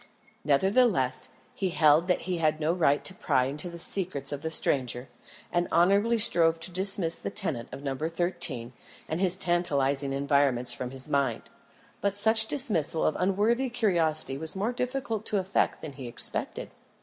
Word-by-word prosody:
Nevertheless, 145 Hz, -, +2 dB, 0.2 s
he 190 Hz, -, -2 dB
held 155 Hz, 0 st, +3 dB
that 180 Hz, -, +1 dB
he 180 Hz, -2 st, -3 dB
had 155 Hz, -1 st, +1 dB
no 160 Hz, +2 st, 0 dB
right 150 Hz, -5 st, +1 dB
to 190 Hz, -, +2 dB
pry 130 Hz, -8 st, +1 dB
into 150 Hz, +6 st, -4 dB
the 170 Hz, -, -9 dB
secrets 170 Hz, -5 st, -1 dB
of 145 Hz, -1 st, -5 dB
the 160 Hz, -, -3 dB
stranger, 130 Hz, -5 st, 0 dB, 0.4 s
and 175 Hz, 0 st, 0 dB
honourably 200 Hz, +7 st, +3 dB
strove 165 Hz, -6 st, +3 dB
to 180 Hz, -, -4 dB
dismiss 185 Hz, -2 st, 0 dB
the -, -, -4 dB
tenant 170 Hz, -, -3 dB
of 140 Hz, -, -9 dB
No. 135 Hz, -2 st, -2 dB
13 160 Hz, -6 st, -1 dB, 0.3 s
and 160 Hz, +3 st, -3 dB
his 185 Hz, -1 st, +2 dB
tantalising 140 Hz, -6 st, +1 dB
environments 135 Hz, -3 st, +2 dB
from 125 Hz, +1 st, -5 dB
his 130 Hz, +1 st, -1 dB
mind. 140 Hz, -2 st, -1 dB, 0.5 s
But 200 Hz, 0 st, 0 dB
such 220 Hz, +2 st, +3 dB
dismissal 190 Hz, -, 0 dB
of -, -, +1 dB
unworthy 215 Hz, +8 st, +1 dB
curiosity 165 Hz, -, 0 dB
was 160 Hz, +3 st, -2 dB
more 205 Hz, +5 st, -1 dB
difficult 250 Hz, -4 st, -3 dB
to 210 Hz, -, 0 dB
effect 190 Hz, 0 st, -1 dB
than 155 Hz, -3 st, -7 dB
he 135 Hz, -3 st, -8 dB
expected. 120 Hz, -, -1 dB
165 Hz, 165 wpm, -27 LUFS, 140-195 Hz, 0.5 s, held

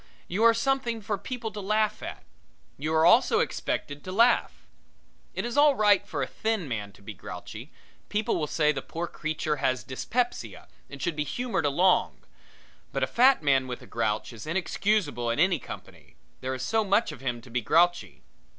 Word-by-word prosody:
You 185 Hz, +5 st, -2 dB
are 230 Hz, -, +7 dB
something 245 Hz, -1 st, 0 dB
for 210 Hz, 0 st, -2 dB
people 230 Hz, +2 st, -5 dB
to 210 Hz, -, -7 dB
laugh 215 Hz, +2 st, 0 dB
at. -, -, -7 dB, 0.5 s
You 155 Hz, +3 st, -3 dB
are 160 Hz, +1 st, +4 dB
also 240 Hz, -, +5 dB
expected 145 Hz, -, -2 dB
to 185 Hz, -, -6 dB
laugh. 235 Hz, +5 st, +2 dB, 0.7 s
It -, -, -2 dB
is 240 Hz, +2 st, -4 dB
all 290 Hz, -1 st, +6 dB
right 205 Hz, -2 st, +4 dB
for -, -, -2 dB
a -, -, -3 dB
thin 220 Hz, -7 st, -2 dB
man 105 Hz, -5 st, -4 dB
to 100 Hz, -, -19 dB
be 110 Hz, -, -7 dB
grouchy; 90 Hz, -, -9 dB, 0.4 s
people 215 Hz, +2 st, 0 dB
will 150 Hz, -, -1 dB
say 150 Hz, 0 st, +2 dB
the 135 Hz, -2 st, -4 dB
poor 165 Hz, +5 st, -4 dB
creature 155 Hz, -2 st, -3 dB
has 130 Hz, -2 st, 0 dB
dyspepsia 240 Hz, -, -3 dB, 0.2 s
and 140 Hz, -, -9 dB
should 160 Hz, +4 st, -2 dB
be 150 Hz, -, -1 dB
humored 240 Hz, -, -1 dB
along. 180 Hz, +6 st, +2 dB, 0.7 s
But -, -, -1 dB
a -, -, +5 dB
fat 255 Hz, -, +4 dB
man 135 Hz, -2 st, +3 dB
with 125 Hz, -1 st, -6 dB
a -, -, -11 dB
grouch 110 Hz, 0 st, -2 dB
is 115 Hz, +6 st, -10 dB
inexcusable 180 Hz, -, 0 dB
in 115 Hz, -, 0 dB
any 175 Hz, -1 st, +3 dB
company -, -, -11 dB, 0.2 s
there 130 Hz, 0 st, -3 dB
is 130 Hz, -, -5 dB
so 220 Hz, +9 st, +1 dB
much 205 Hz, 0 st, +2 dB
of 145 Hz, -4 st, -11 dB
him 125 Hz, -3 st, -2 dB
to 120 Hz, +1 st, -15 dB
be 120 Hz, +1 st, 0 dB
grouchy. 175 Hz, +8 st, +2 dB
175 Hz, 190 wpm, -27 LUFS, 135-220 Hz, 0.7 s, are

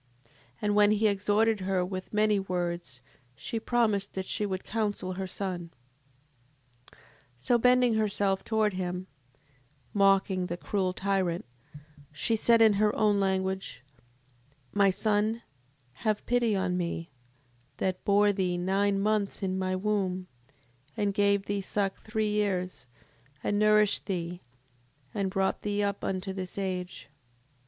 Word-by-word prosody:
7:26. 115 Hz, -, -27 dB, 0.3 s
And 205 Hz, 0 st, +1 dB
when 210 Hz, 0 st, +5 dB
he 215 Hz, +1 st, +1 dB
had 210 Hz, -, +5 dB
exhorted 210 Hz, +2 st, +2 dB
her 185 Hz, -1 st, 0 dB
with 185 Hz, 0 st, -6 dB
many 210 Hz, -1 st, +3 dB
words 175 Hz, -7 st, -3 dB, 0.3 s
she 190 Hz, +11 st, -4 dB
promised 220 Hz, -4 st, 0 dB
that 190 Hz, -1 st, -3 dB
she 210 Hz, -, -1 dB
would 190 Hz, -1 st, -3 dB
counsel 205 Hz, -4 st, -2 dB
her 190 Hz, +1 st, -4 dB
son. 185 Hz, -3 st, -4 dB, 1.2 s
7:27. -, -, -23 dB, 0.4 s
So 240 Hz, -, +2 dB
bending 250 Hz, 0 st, +4 dB
herself 205 Hz, -3 st, +1 dB
towards 215 Hz, -2 st, +1 dB
him, 180 Hz, 0 st, -3 dB, 0.9 s
mocking 195 Hz, -2 st, +3 dB
the 175 Hz, -, -4 dB
cruel 185 Hz, 0 st, -1 dB
tyrant, 190 Hz, -4 st, -1 dB, 0.7 s
she 150 Hz, +10 st, 0 dB
said 230 Hz, +1 st, +5 dB
in 220 Hz, -1 st, +6 dB
her 210 Hz, -1 st, +3 dB
own 210 Hz, -2 st, +3 dB
language: 190 Hz, -8 st, -1 dB, 0.9 s
My 200 Hz, -1 st, +4 dB
son 215 Hz, +3 st, 0 dB, 0.6 s
have 215 Hz, -2 st, 0 dB
pity 240 Hz, -3 st, +2 dB
upon 185 Hz, -2 st, 0 dB
me, 170 Hz, -2 st, -3 dB, 0.7 s
that 185 Hz, -1 st, -2 dB
bore 205 Hz, 0 st, +4 dB
thee 185 Hz, -2 st, 0 dB
nine 195 Hz, +2 st, +1 dB
months 210 Hz, 0 st, 0 dB
in 190 Hz, 0 st, -1 dB
my 185 Hz, 0 st, -1 dB
womb, 185 Hz, -2 st, -1 dB, 0.7 s
and 205 Hz, -2 st, 0 dB
gave 200 Hz, 0 st, +2 dB
thee 200 Hz, -1 st, -1 dB
suck 195 Hz, 0 st, -2 dB
three 215 Hz, -1 st, -1 dB
years, 185 Hz, -9 st, -1 dB, 0.6 s
and 205 Hz, -, 0 dB
nourished 210 Hz, -1 st, +3 dB
thee, 175 Hz, -2 st, -3 dB, 0.7 s
and 200 Hz, -3 st, -1 dB
brought 190 Hz, 0 st, 0 dB
thee 205 Hz, 0 st, -1 dB
up 200 Hz, -1 st, -2 dB
unto 190 Hz, 0 st, -2 dB
this 185 Hz, -1 st, -6 dB
age. 185 Hz, -2 st, -4 dB
195 Hz, 140 wpm, -29 LUFS, 185-210 Hz, 1.2 s, in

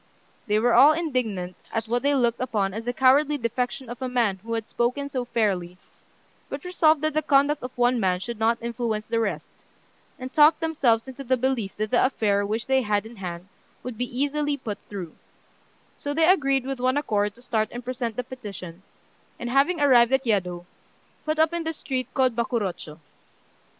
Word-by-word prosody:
They 210 Hz, 0 st, +2 dB
were 235 Hz, +2 st, +3 dB
all 295 Hz, +3 st, +8 dB
indignant 235 Hz, -, -2 dB, 0.2 s
at 225 Hz, 0 st, -2 dB
what 240 Hz, +2 st, 0 dB
they 285 Hz, +1 st, +2 dB
looked 235 Hz, -3 st, +1 dB
upon 210 Hz, -6 st, -1 dB
as 225 Hz, +2 st, -5 dB
the 245 Hz, -, 0 dB
cowardly 275 Hz, +4 st, +4 dB
defection 250 Hz, +1 st, -3 dB
of 240 Hz, +2 st, -8 dB
a 260 Hz, -, -2 dB
man 235 Hz, -6 st, +1 dB
who 230 Hz, +2 st, -5 dB
had 225 Hz, -1 st, -4 dB
spoken 255 Hz, +4 st, -1 dB
so 255 Hz, -2 st, -2 dB
fairly, 195 Hz, -7 st, -1 dB, 0.7 s
but 275 Hz, +1 st, -6 dB
resolved 320 Hz, -4 st, +3 dB
that 310 Hz, -1 st, 0 dB
the 310 Hz, -, +1 dB
conduct 285 Hz, 0 st, +3 dB
of 250 Hz, -, -5 dB
one 245 Hz, 0 st, +3 dB
man 185 Hz, -3 st, +1 dB
should 235 Hz, +3 st, -6 dB
not 230 Hz, +1 st, +2 dB
influence 230 Hz, -2 st, -3 dB
the 230 Hz, 0 st, -1 dB
rest, 195 Hz, -9 st, -2 dB, 0.7 s
and 255 Hz, +1 st, -8 dB
talked 305 Hz, 0 st, +6 dB
themselves 270 Hz, -8 st, +1 dB
into 265 Hz, +1 st, -8 dB
the 260 Hz, 0 st, +1 dB
belief 245 Hz, -5 st, -1 dB
that 215 Hz, 0 st, -2 dB
the 245 Hz, -, +4 dB
affair 210 Hz, -6 st, +1 dB
which 220 Hz, +2 st, -2 dB
they 265 Hz, 0 st, +2 dB
had 210 Hz, -2 st, 0 dB
in 230 Hz, +1 st, -11 dB
hand 180 Hz, -1 st, -6 dB, 0.4 s
would 250 Hz, -1 st, -6 dB
be 250 Hz, 0 st, -3 dB
easily 290 Hz, 0 st, 0 dB
put 220 Hz, -6 st, -6 dB
through; 185 Hz, -6 st, -7 dB, 0.8 s
so 285 Hz, 0 st, -4 dB
they 325 Hz, 0 st, +4 dB
agreed 275 Hz, -7 st, +3 dB
with 270 Hz, -1 st, -4 dB
one 255 Hz, +2 st, +1 dB
accord 205 Hz, -7 st, 0 dB
to 245 Hz, -, -16 dB
start 220 Hz, -3 st, 0 dB
and 240 Hz, 0 st, -7 dB
present 245 Hz, -3 st, -3 dB
the 250 Hz, -, -2 dB
petition, 195 Hz, -9 st, -9 dB, 0.6 s
and, 240 Hz, 0 st, -4 dB
having 285 Hz, +6 st, +3 dB
arrived 250 Hz, -4 st, +5 dB
at 265 Hz, 0 st, +2 dB
Yedo, 180 Hz, -5 st, -1 dB, 0.6 s
put 310 Hz, 0 st, -1 dB
up 320 Hz, +1 st, +3 dB
in 340 Hz, -1 st, -2 dB
the 320 Hz, 0 st, -2 dB
street 260 Hz, -4 st, -4 dB
called 255 Hz, -3 st, +2 dB
Bakurochô. 195 Hz, -10 st, -3 dB
245 Hz, 195 wpm, -25 LUFS, 215-275 Hz, 0.8 s, all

